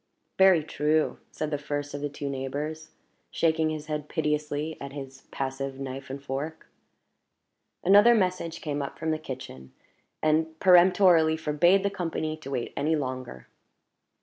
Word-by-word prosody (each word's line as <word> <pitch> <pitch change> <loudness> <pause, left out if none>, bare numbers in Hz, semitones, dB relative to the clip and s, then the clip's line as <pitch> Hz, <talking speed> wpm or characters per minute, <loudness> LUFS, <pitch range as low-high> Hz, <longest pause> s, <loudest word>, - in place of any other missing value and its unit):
"Very 190 -4 +6
true," 150 +1 0
said 155 0 -4
the 145 - -1
first 145 0 -4
of 145 - -5
the 145 - -2
two 145 0 -6
neighbors, 145 +4 -4 0.4
shaking 160 -1 +1
his 155 -1 -4
head 150 -1 -4
piteously 150 -1 -1
at 140 - -7
his 135 -2 -9
passive 135 0 -4
knife 135 0 -6
and 135 +1 -5
fork. 140 +4 -5 1.2
Another 205 +5 +7
message 180 -5 -1
came 145 -2 -2
up 140 - -6
from 160 - -2
the 155 - -1
kitchen, 125 - -9 0.5
and 160 +1 +1
peremptorily 180 -3 +5
forbade 165 +5 +3
the 200 - 0
company 165 -4 -3
to 155 -3 -10
wait 125 -3 -3
any 155 +3 +1
longer. 130 - -5
150 Hz, 150 wpm, -27 LUFS, 140-160 Hz, 1.2 s, Another